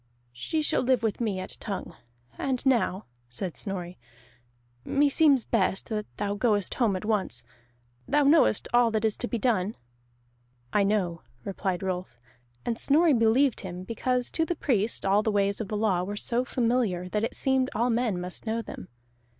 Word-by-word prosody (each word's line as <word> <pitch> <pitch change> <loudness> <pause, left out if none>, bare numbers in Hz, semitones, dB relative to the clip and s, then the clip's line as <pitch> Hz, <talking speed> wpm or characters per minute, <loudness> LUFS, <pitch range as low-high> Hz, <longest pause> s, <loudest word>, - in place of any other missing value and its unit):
"She 310 - -2
shall - - +2
live 255 -2 +2
with 220 +1 -1
me 210 -5 0
at 185 - -6
Tongue. 200 -5 -5 0.4
And 260 -1 -2
now," 230 -6 +2 0.2
said 165 +8 -4
Snorri, 180 -3 -5 0.8
"meseems 285 -2 +3
best 195 -4 0
that 210 -2 -3
thou 205 -1 -1
goest 205 -2 +1
home 225 -6 +1
at 185 - -5
once. 200 - -1 0.6
Thou 295 - +3
knowest 285 -6 +4
all 240 -1 +5
that 220 0 0
is 220 - +1
to 245 - -3
be 235 - -2
done?" 215 -4 0 1.0
"I 210 - +4
know," 190 -5 0 0.2
replied 190 -2 -3
Rolf; 180 -10 -4 0.5
and 230 -1 -2
Snorri 315 +2 +4
believed 235 +2 +3
him, 180 -1 -6
because 245 +4 -1
to 325 - +1
the 345 +2 -1
Priest 230 -10 0
all 195 +2 +4
the 220 - 0
ways 200 +1 +1
of 215 - -4
the 210 - -3
law 205 -5 +1
were 205 +3 -4
so 235 +3 0
familiar 230 -8 0
that 210 +3 -1
it 230 - -2
seemed 265 -1 +1
all 240 +2 +2
men 230 -5 0
must 180 +5 -6
know 225 +1 -1
them. - - -9
220 Hz, 175 wpm, -27 LUFS, 195-245 Hz, 1.0 s, all